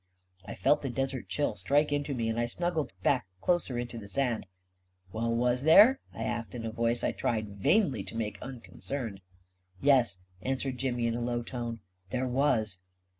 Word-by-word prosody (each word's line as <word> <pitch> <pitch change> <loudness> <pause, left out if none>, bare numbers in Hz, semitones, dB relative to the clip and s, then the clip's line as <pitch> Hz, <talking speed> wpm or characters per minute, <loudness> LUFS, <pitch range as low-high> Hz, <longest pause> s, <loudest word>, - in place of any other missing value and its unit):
I - - -5
felt 145 +10 +3
the 135 - -3
desert 135 +1 -2
chill 145 -6 0
strike 140 +10 +2
into 145 -1 -1
me, 115 -2 -1
and 115 +1 -1
I 120 - +1
snug 175 +8 -1
gled 155 -3 -1
back 125 -7 +2
closer 170 - +1
into 120 -1 -4
the 100 - -9
sand. 120 -3 -1 0.7
"Well, 115 +1 0
was 125 +2 +2
there?" 210 - +8
I 115 - -5
asked, 115 +1 -3
in 115 -2 -5
a 110 - -2
voice 115 +1 0
I - - +2
tried 110 -3 -1
vainly 135 - +2
to 115 - -6
make 105 -3 -3
unconcerned. 125 -3 -5 0.3
" 90 0 -45
Yes," 125 -5 +4 0.2
answered 130 -1 -2
Jimmy, 125 -3 0
in 115 - +1
a 120 - -2
low 120 0 -1
tone, 120 -2 -5
" 90 0 -38
there 130 +4 -1
was." 120 -7 +1
120 Hz, 190 wpm, -30 LUFS, 115-135 Hz, 0.7 s, there